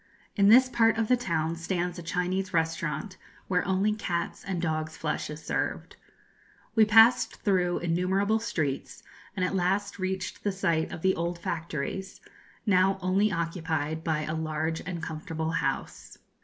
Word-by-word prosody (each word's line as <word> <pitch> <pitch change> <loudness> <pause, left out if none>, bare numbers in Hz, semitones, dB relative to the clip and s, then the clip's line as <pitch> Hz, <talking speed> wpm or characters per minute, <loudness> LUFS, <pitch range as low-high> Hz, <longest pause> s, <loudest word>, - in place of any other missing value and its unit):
In 200 -1 +5
this 255 +4 +8
part 225 -3 +3
of 225 -1 0
the 250 - +6
town 165 -8 -1
stands 175 +1 -2
a - - -5
Chinese 180 +2 -2
restaurant 160 +2 -1 0.3
where 180 -1 +1
only 195 +3 +2
cats' 180 -5 -3
and 190 -3 -3
dogs' 155 -1 -2
flesh 155 -1 -2
is 150 +1 -8
served. - - -2 0.8
We 220 -1 +6
passed 225 +3 +5
through 180 -4 +2
innumerable 190 +5 +1
streets, 155 -11 -3 0.3
and 185 -2 +1
at 180 - -2
last 195 +2 0
reached 185 0 -3
the 205 - +1
site 170 -5 0
of 165 - -7
the 190 0 +4
old 170 +1 -2
factories, 165 +2 -4 0.5
now 195 -2 +3
only 195 +3 +2
occupied 160 -3 -2
by 155 -2 0
a 155 - -3
large 160 0 -2
and 170 -2 -4
comfortable 160 0 -3
house. - - -3
180 Hz, 155 wpm, -28 LUFS, 160-195 Hz, 0.8 s, this